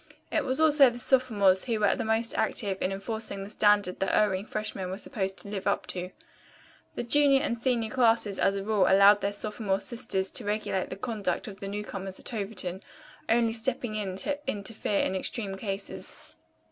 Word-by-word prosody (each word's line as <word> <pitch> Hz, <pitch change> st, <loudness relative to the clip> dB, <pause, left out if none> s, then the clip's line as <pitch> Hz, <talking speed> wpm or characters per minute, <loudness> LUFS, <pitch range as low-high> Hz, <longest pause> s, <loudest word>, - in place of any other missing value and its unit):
It -, -, 0 dB
was 260 Hz, +2 st, 0 dB
also 295 Hz, -4 st, +6 dB
the 240 Hz, -, -8 dB
sophomores 215 Hz, -8 st, +3 dB
who 230 Hz, -4 st, -1 dB
were 205 Hz, -2 st, +3 dB
the -, -, -3 dB
most 225 Hz, +1 st, 0 dB
active 195 Hz, -3 st, 0 dB
in 185 Hz, -, 0 dB
enforcing 200 Hz, 0 st, -4 dB
the 200 Hz, -, -8 dB
standard 205 Hz, -4 st, +2 dB
that 195 Hz, -, 0 dB
erring 200 Hz, -1 st, +1 dB
freshmen 210 Hz, -3 st, -4 dB
were 190 Hz, -, -4 dB
supposed 195 Hz, -4 st, -3 dB
to -, -, -9 dB
live 200 Hz, -1 st, -4 dB
up 200 Hz, -, 0 dB
to. 180 Hz, 0 st, -5 dB, 0.9 s
The -, -, -3 dB
junior 275 Hz, +2 st, +4 dB
and 235 Hz, -, -1 dB
senior 235 Hz, -2 st, 0 dB
classes 230 Hz, -5 st, +2 dB
as 195 Hz, -, +2 dB
a 195 Hz, -, -3 dB
rule 205 Hz, -2 st, +2 dB
allowed 200 Hz, +1 st, +6 dB
their 200 Hz, -, 0 dB
sophomore 205 Hz, -1 st, -1 dB
sisters 225 Hz, -6 st, -1 dB
to 245 Hz, -, -3 dB
regulate 205 Hz, -2 st, -2 dB
the -, -, -5 dB
conduct 215 Hz, 0 st, -3 dB
of 195 Hz, -2 st, -9 dB
the 195 Hz, -, -6 dB
newcomers 195 Hz, -2 st, -5 dB
at -, -, -6 dB
Overton, 195 Hz, -3 st, -4 dB, 0.5 s
only 230 Hz, 0 st, +3 dB
stepping 235 Hz, 0 st, -2 dB
in 195 Hz, -3 st, -3 dB
to 285 Hz, +9 st, -2 dB
interfere 205 Hz, 0 st, -1 dB
in 190 Hz, -, -1 dB
extreme 195 Hz, +1 st, -2 dB
cases. 195 Hz, 0 st, -6 dB
210 Hz, 185 wpm, -28 LUFS, 195-230 Hz, 0.9 s, also